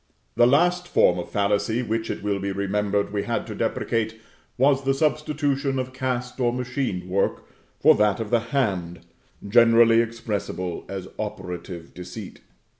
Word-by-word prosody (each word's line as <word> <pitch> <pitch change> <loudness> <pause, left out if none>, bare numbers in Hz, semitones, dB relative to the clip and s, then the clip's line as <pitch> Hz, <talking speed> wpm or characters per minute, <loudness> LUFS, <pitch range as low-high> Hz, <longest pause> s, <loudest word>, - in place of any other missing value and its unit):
The 120 +1 +5
last 175 +6 +3
form 135 - +3
of 85 - -6
fallacy 105 +4 0
which 115 -1 -2
it - - -4
will 100 -1 0
be 100 0 -2
remembered 100 +1 -1
we 100 - 0
had - - -2
to - - -6
deprecate, 110 -1 -1 0.4
was 135 +1 +3
the 135 0 +1
substitution 145 -2 0
of 130 0 -3
cast 125 -1 -3
or 120 -2 +2
machine 125 -7 -3
work 95 +2 0 0.4
for - - +7
that 105 -1 +2
of 110 -2 -4
the 120 - +4
hand, 95 - -1 0.5
generally 115 +1 +6
expressible 105 -6 -4
as 95 -1 -5
Operative 90 -4 -6
Deceit. 90 +3 -9
115 Hz, 150 wpm, -24 LUFS, 100-130 Hz, 0.5 s, for